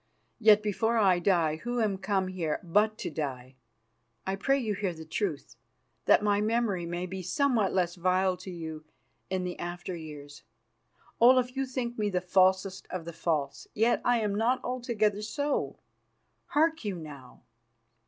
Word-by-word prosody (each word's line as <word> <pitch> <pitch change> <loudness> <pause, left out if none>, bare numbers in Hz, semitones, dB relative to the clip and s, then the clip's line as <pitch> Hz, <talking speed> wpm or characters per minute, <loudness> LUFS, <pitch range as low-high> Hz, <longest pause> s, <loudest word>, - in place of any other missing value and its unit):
Yet, 215 -2 +6
before 220 +3 +1
I 190 -5 +4
die, 170 -4 +2
who 240 +7 -3
am 205 -4 0
come 195 -1 0
here 170 -5 -2
but 210 +5 +2
to - - -4
die, 130 -4 -4 0.7
I 190 - -1
pray 270 +8 +2
you 225 -6 -1
hear 195 -3 -2
the 160 0 -9
truth, 160 -2 -3 0.5
that - - +5
my 205 -1 +2
memory 215 -5 0
may 175 +1 -3
be 190 +1 -5
somewhat 225 +2 +1
less 180 -2 +1
vile 185 +1 +1
to 185 +1 -9
you 160 -3 -6 0.5
in 185 -1 -1
the 180 -1 -5
after 175 +1 -5
years. 150 -3 -9 0.8
Olaf, 250 +1 +5
you 270 0 -1
think 245 -2 -4
me 210 -1 +1
the 185 -2 0
falsest 190 +1 +2
of 180 -3 -5
the 170 - -7
false, 155 -4 -2
yet 230 +3 +3
I 245 0 +3
am 210 -2 0
not 230 +5 +2
altogether 230 -5 0
so. 285 +7 -2 0.7
Hark 320 0 +2
you 205 -3 -2
now! 145 -8 -11
190 Hz, 165 wpm, -29 LUFS, 175-225 Hz, 0.8 s, Yet